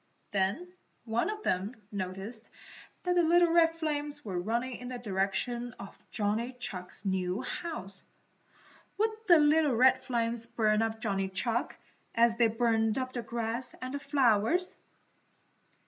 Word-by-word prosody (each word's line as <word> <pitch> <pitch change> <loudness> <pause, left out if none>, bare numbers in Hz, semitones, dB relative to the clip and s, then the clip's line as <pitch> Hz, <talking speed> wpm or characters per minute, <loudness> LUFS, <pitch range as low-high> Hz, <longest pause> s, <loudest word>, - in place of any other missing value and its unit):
Then 205 - -1 0.3
one 230 - 0
of 425 0 -5
them 190 +7 -1 0.2
noticed 195 +4 -4 0.5
that 360 - +1
the 355 - +4
little 340 +1 +4
red 330 -1 +5
flames 295 -3 -3
were 185 -4 -2
running 235 +6 -2
in 250 - -8
the 250 0 -4
direction 230 +3 -2
of 195 - -9
Johnny 225 +3 -1
Chuck's 200 -6 -5
new 190 0 -1
house. 200 - -6 0.9
Would 440 +2 +2 0.2
the 345 -3 +8
little 300 -2 +4
red 260 +2 +5
flames 230 -2 0
burn 220 -2 +2
up 225 0 -2
Johnny 195 -3 -1
Chuck, 230 +5 -1 0.4
as 230 0 +4
they 235 -1 +5
burned 225 0 +1
up 255 -1 -3
the 240 - -2
grass 235 +2 -2
and 255 +1 -5
the 285 - -2
flowers? 275 - +2
235 Hz, 145 wpm, -30 LUFS, 210-280 Hz, 0.9 s, the